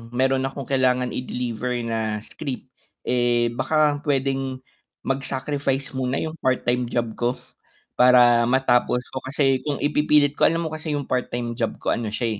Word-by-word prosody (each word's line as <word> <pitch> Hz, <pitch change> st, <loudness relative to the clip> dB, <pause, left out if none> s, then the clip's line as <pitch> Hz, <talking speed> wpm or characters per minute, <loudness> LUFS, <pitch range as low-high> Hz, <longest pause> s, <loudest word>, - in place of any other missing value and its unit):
meron 130 Hz, +1 st, +2 dB
akong 135 Hz, 0 st, -6 dB
kailangan 125 Hz, -1 st, +1 dB
i-deliver 125 Hz, -1 st, -3 dB
na 110 Hz, -2 st, -2 dB
script, 135 Hz, -3 st, -7 dB, 0.3 s
eh, 120 Hz, -1 st, +2 dB
baka 150 Hz, +3 st, +1 dB
puwedeng 135 Hz, -2 st, -1 dB, 0.4 s
mag-sacrifice 135 Hz, 0 st, -2 dB
muna 130 Hz, -1 st, -2 dB
yung 160 Hz, 0 st, -6 dB
part-time 125 Hz, -1 st, 0 dB
job 120 Hz, -1 st, -1 dB
ko 120 Hz, +1 st, +1 dB, 0.6 s
para 120 Hz, -2 st, +6 dB
matapos 125 Hz, -1 st, +2 dB
ko 130 Hz, -, -4 dB
kasi 135 Hz, -1 st, +2 dB
kung 145 Hz, -, 0 dB
ipipilit 150 Hz, -1 st, +3 dB
ko -, -, +6 dB
alam 165 Hz, +1 st, 0 dB
mo 160 Hz, -, -4 dB
kasi 155 Hz, -1 st, -3 dB
yung 145 Hz, -, -2 dB
part-time 120 Hz, -2 st, -2 dB
job 115 Hz, -1 st, -2 dB
ko -, -, +1 dB
ano 115 Hz, -, -1 dB
siya 110 Hz, 0 st, -2 dB
130 Hz, 150 wpm, -23 LUFS, 120-140 Hz, 0.6 s, para